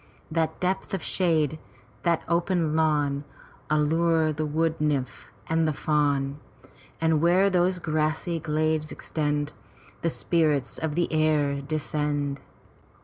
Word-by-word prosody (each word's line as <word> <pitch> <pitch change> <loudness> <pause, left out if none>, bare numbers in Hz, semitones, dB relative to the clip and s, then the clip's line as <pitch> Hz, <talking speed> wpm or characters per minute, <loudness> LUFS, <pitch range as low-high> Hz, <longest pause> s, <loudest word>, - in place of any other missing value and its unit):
That 160 0 0
depth 190 +2 -1
of 190 - -5
shade, 160 -4 +1 0.4
that 170 -2 +1
open 170 -2 +1
lawn 145 -3 +1 0.5
Allure 160 +1 +2
the 155 +1 -2
wood 160 +1 0
nymph 140 -5 -1 0.2
and 160 0 +2
the 155 - +1
fawn; 145 -2 0 0.6
Andy 160 -1 +3
where 180 +5 +4
those 180 0 +2
grassy 160 +1 -1
glades 155 0 0
extend 150 -1 -2 0.3
y - - -22
The 165 - +1
spirits 155 -6 0
of 160 -2 -2
the 175 - +2
air 150 -3 +2
descend. 145 -1 -2
155 Hz, 125 wpm, -26 LUFS, 150-165 Hz, 0.6 s, where